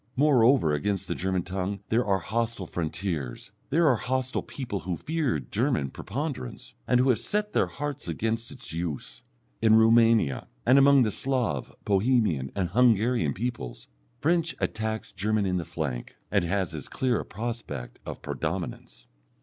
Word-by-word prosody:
Moreover, 130 Hz, -, +4 dB
against 95 Hz, +6 st, -1 dB
the -, -, -1 dB
German 95 Hz, -1 st, -1 dB
tongue 95 Hz, +2 st, -3 dB
there 115 Hz, +3 st, +3 dB
are 100 Hz, -3 st, +2 dB
hostile 110 Hz, +2 st, -2 dB
frontiers, 80 Hz, -5 st, -4 dB, 0.2 s
there 165 Hz, +4 st, +3 dB
are 130 Hz, -5 st, +4 dB
hostile 130 Hz, +3 st, -1 dB
people 120 Hz, -8 st, -5 dB
who 90 Hz, -2 st, -3 dB
fear 155 Hz, -5 st, -1 dB
German 105 Hz, -, -1 dB
preponderance, 130 Hz, -, -5 dB
and 125 Hz, -, +4 dB
who 130 Hz, +2 st, +4 dB
have 120 Hz, -4 st, +3 dB
set 210 Hz, -, -2 dB
their -, -, +3 dB
hearts 145 Hz, -3 st, -5 dB
against 110 Hz, +7 st, -1 dB
its 125 Hz, -, -6 dB
use. 80 Hz, -7 st, -4 dB, 0.4 s
In 110 Hz, 0 st, +6 dB
Roumania, 115 Hz, -, +4 dB, 0.2 s
and 135 Hz, -, +6 dB
among 140 Hz, -1 st, +7 dB
the 110 Hz, -, +1 dB
Slav, 125 Hz, -, -1 dB
Bohemian, 100 Hz, -, +2 dB
and 95 Hz, -3 st, 0 dB
Hungarian 115 Hz, -, +3 dB
peoples, 90 Hz, -, -5 dB, 0.3 s
French 165 Hz, +1 st, +1 dB
attacks 110 Hz, 0 st, -2 dB
German 105 Hz, +1 st, 0 dB
in 90 Hz, -1 st, +1 dB
the 85 Hz, -, -3 dB
flank, 65 Hz, -7 st, -4 dB, 0.2 s
and -, -, +2 dB
has 95 Hz, -1 st, -1 dB
as 75 Hz, -4 st, -6 dB
clear 125 Hz, -3 st, 0 dB
a -, -, -3 dB
prospect 115 Hz, -, -5 dB
of -, -, -7 dB
predominance. -, -, -4 dB
110 Hz, 155 wpm, -27 LUFS, 90-125 Hz, 0.4 s, among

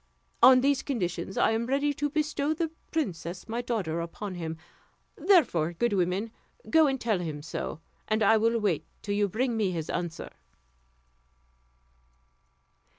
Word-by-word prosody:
On 255 Hz, +1 st, +8 dB
these 275 Hz, 0 st, +2 dB
conditions 185 Hz, -, -3 dB
I -, -, +4 dB
am 225 Hz, +1 st, -1 dB
ready 280 Hz, +2 st, +1 dB
to 290 Hz, +1 st, -1 dB
bestow 305 Hz, 0 st, 0 dB
the 325 Hz, 0 st, -2 dB, 0.2 s
princess 180 Hz, -, -3 dB
my 230 Hz, +2 st, -2 dB
daughter 200 Hz, -10 st, -2 dB
upon 185 Hz, +4 st, -6 dB
him; 165 Hz, -2 st, -5 dB, 0.6 s
therefore, 225 Hz, -, +3 dB
good 235 Hz, +6 st, 0 dB
woman, 190 Hz, +4 st, 0 dB, 0.4 s
go 320 Hz, -1 st, +6 dB
and 270 Hz, -1 st, 0 dB
tell 220 Hz, -6 st, 0 dB
him 155 Hz, -4 st, -5 dB
so, 160 Hz, 0 st, -5 dB, 0.3 s
and 215 Hz, 0 st, +1 dB
I 225 Hz, +2 st, +6 dB
will 230 Hz, +1 st, +2 dB
wait 200 Hz, -8 st, 0 dB, 0.2 s
till 205 Hz, -, -2 dB
you 205 Hz, 0 st, +2 dB
bring 240 Hz, +4 st, 0 dB
me 215 Hz, -4 st, +1 dB
his 165 Hz, -3 st, -3 dB
answer." 170 Hz, -2 st, -4 dB
220 Hz, 150 wpm, -28 LUFS, 175-265 Hz, 0.6 s, On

